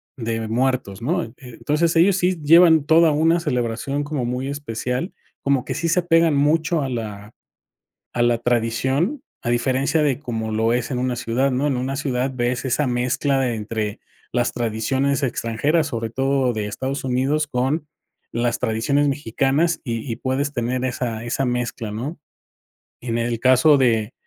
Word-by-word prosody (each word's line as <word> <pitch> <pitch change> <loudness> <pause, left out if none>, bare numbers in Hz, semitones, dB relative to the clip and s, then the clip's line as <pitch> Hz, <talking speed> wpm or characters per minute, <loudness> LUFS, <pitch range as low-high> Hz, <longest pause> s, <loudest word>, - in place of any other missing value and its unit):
de 115 -2 -3
Muertos, 120 -3 -1
¿no?, 120 - 0
eh, 115 - -13
entonces 150 +6 -1
ellos 185 +3 +5
sí 180 -2 +1
llevan 160 0 +6
toda 160 +1 +5
una 165 +3 +2
celebración 130 0 -2
como 145 -4 -3
muy 125 +2 -2
especial, 135 - -3 0.3
como 140 -2 +1
que - - -3
sí 165 0 -1
se 180 - +3
apegan 165 -3 +3
mucho 155 +2 +2
a 135 - -2
la 110 -3 -6 0.8
a 120 - 0
la 120 -1 +3
tradición, 125 - 0 0.3
a - - 0
diferencia 135 +5 +1
de 140 -2 +1
como 110 -6 -4
lo 110 +1 +1
es 120 0 0
en 125 - -1
una 125 0 -1
ciudad, 130 +4 0
¿no? 135 +4 0
En 135 - 0
una 130 +2 -2
ciudad 130 -2 -1
ves 120 0 -1
esa 135 +2 0
mezcla 125 +3 0
de 125 -3 0
entre 110 0 -3 0.3
las 120 -1 0
tradiciones 125 +5 0
extranjeras, 140 +6 0
sobre 115 -4 -3
todo 135 +1 +1
de 105 -1 -3
Estados 135 +6 -4
Unidos, 135 +4 0
con 140 +4 -1 0.5
las 120 0 -1
tradiciones 125 +5 +1
mexicanas 140 +5 0
y 115 -1 -4
y - - -2
puedes 135 +3 -1
tener 125 +1 -1
esa 120 -3 -3
esa 125 +3 -1
mezcla, 120 -3 -2
¿no? 135 +10 -5 0.8
En 115 -2 -2
el 115 -1 -1
caso 130 +4 +5
de 115 -3 +1
130 Hz, 165 wpm, -22 LUFS, 120-145 Hz, 0.8 s, llevan